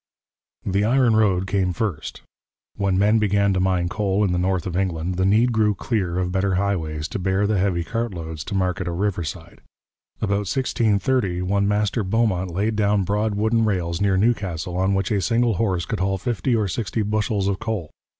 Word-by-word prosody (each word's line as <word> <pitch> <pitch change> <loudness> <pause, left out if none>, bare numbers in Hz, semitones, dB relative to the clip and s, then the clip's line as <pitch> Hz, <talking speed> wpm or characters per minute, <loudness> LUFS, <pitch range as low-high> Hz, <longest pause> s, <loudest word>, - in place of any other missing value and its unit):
The 100 +1 +1
iron 120 0 +3
road 95 -4 +2
came 95 -2 0
first. 90 -7 -4 0.5
When 100 -2 0
men 105 +3 +4
began 100 -1 +2
to 95 - 0
mine 90 -1 +1
coal 100 +2 0
in 100 - +1
the 90 - 0
north 90 -1 0
of 90 -2 -4
England, 90 -2 -1
the 95 +1 +1
need 115 +5 +3
grew 110 -2 +2
clear 95 -6 -2
of 90 -1 -1
better 95 0 0
highways 80 -6 -1
to 120 - -4
bear 95 +2 +1
the 105 -1 +1
heavy 90 -3 0
cart 115 +5 -3
loads 80 -4 -6
to - - -4
market 90 -1 -1
or 85 - -2
riverside. 90 -3 -4 0.6
About 100 -2 -1
1630 110 -6 0
one 100 +2 +1
Master 105 +2 0
Beaumont 95 -3 0
laid 100 +6 -1
down 105 -1 +2
broad 105 +2 0
wooden 110 +2 +2
rails 90 -5 -1
near 100 -2 +2
Newcastle, 95 -6 0
on 95 +2 +1
which 95 +1 -1
a 100 -2 +1
single 115 -1 +1
horse 95 -6 0
could - - -3
haul 95 +1 0
fifty 120 +3 -1
or 110 -3 +1
sixty 110 +3 -2
bushels 105 -1 0
of 100 -1 -1
coal. 105 -9 -4
100 Hz, 190 wpm, -22 LUFS, 90-105 Hz, 0.6 s, men